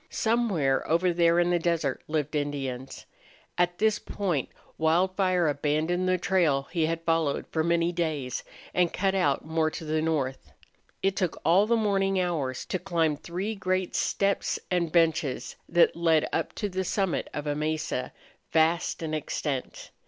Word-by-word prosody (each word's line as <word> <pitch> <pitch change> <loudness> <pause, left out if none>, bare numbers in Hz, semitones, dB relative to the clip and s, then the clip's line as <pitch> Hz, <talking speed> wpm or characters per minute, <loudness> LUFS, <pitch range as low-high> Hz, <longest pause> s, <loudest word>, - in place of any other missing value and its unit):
Somewhere 205 - +1
over 170 +2 +3
there 170 0 +3
in 175 0 +2
the 175 - +2
desert 165 -5 0
lived 150 -1 -1
Indians. 135 -3 -4 0.5
At 175 0 +1
this 215 -1 +2
point 175 -10 -2 0.3
Wildfire 180 +2 +2
abandoned 155 +5 0
the 185 - +3
trail 170 -6 +2
he 165 -3 +1
had 165 0 -2
followed 165 -3 +1
for 160 - +1
many 170 +1 +2
days 155 -7 -2 0.3
and 180 -2 +2
cut 195 0 0
out 150 -9 +1
more 160 0 +1
to 160 - -7
the 155 0 0
north. 145 -5 -2 0.5
It 195 0 +2
took 180 -3 -1
all 185 +6 +5
the 235 - +3
morning 195 -3 +1
hours 155 -8 -2
to 185 - -2
climb 165 -4 +1
three 180 +8 -4
great 185 -2 -1
steppes 200 0 0
and 170 -3 +1
benches 160 -4 +1
that 175 0 +4
led 165 -2 +3
up - - -1
to 210 - -2
the 190 -1 -2
summit 190 -1 -1
of 145 - -5
a 145 - 0
mesa, 155 -3 -2 0.4
vast 165 +1 +2
in 155 -1 -3
extent. 145 -3 -3
170 Hz, 160 wpm, -27 LUFS, 155-185 Hz, 0.5 s, all